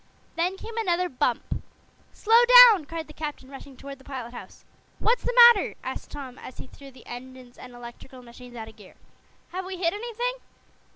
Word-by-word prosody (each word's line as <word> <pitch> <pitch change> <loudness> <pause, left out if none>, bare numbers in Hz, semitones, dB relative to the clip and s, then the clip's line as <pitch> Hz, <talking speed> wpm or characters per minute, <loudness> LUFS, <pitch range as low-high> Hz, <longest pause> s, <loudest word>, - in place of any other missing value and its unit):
Then 360 +3 -1
came 450 +3 -10
another 360 -4 0
bump. 250 -4 -2 0.5
"Slow 455 +2 +3 0.3
down!" 370 -8 -1
cried 325 +2 -7
the 305 - -15
captain, 295 -4 -7
rushing 270 -1 -12
toward 275 0 -10
the - - -18
pilot 255 -4 -8
house. - - -12 0.3
"What's 475 +2 +1
the - - 0
matter?" 405 - -4
asked - - -7
Tom, 265 -3 -10
as 255 - -12
he - - -9
threw 275 +1 -15
the 260 - -18
engines 250 0 -11
and 250 -1 -13
electrical 240 +2 -13
machines 245 +1 -14
out 220 -2 -8
of 220 0 -15
gear. 205 -3 -17 0.5
"Have 370 +2 -5
we 375 0 -7
hit 340 -1 0
anything?" 475 +3 -4
280 Hz, 185 wpm, -25 LUFS, 250-375 Hz, 0.5 s, Slow